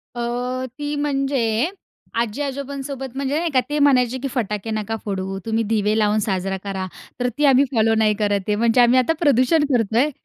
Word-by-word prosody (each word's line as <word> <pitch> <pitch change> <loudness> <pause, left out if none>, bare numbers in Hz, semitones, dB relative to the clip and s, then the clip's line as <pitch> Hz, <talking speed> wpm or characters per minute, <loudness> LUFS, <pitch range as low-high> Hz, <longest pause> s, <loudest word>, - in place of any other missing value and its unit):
अ, 240 - -4 0.6
ती 295 0 -3
म्हणजे, 275 -3 0 0.5
आजी-आजोबांसोबत 270 +2 -4
म्हणजे 275 +2 -1
नाही 340 0 -1
का 255 - +5
ते 295 - 0
म्हणायचे, 260 -3 +3
की 275 +2 -3
फटाके 210 -3 -2
नका 215 0 -2
फोडू 195 -1 -3
तुम्ही 225 0 +1
दिवे 210 0 +1
लावून 210 0 +2
साजरा 190 -1 -1
करा. 190 -2 -3 0.3
तर 250 - +1
ती 295 - +2
आम्ही 270 0 +5
फॉलो 225 -2 +3
नाही 220 -1 +3
करत 205 -2 +1
आहे 210 - +2
म्हणजे 230 +2 +3
आम्ही 245 +1 +5
आता 255 +5 +3
प्रदूषण 290 0 +3
करतोय. 235 +5 +2
240 Hz, 175 wpm, -21 LUFS, 215-275 Hz, 0.6 s, का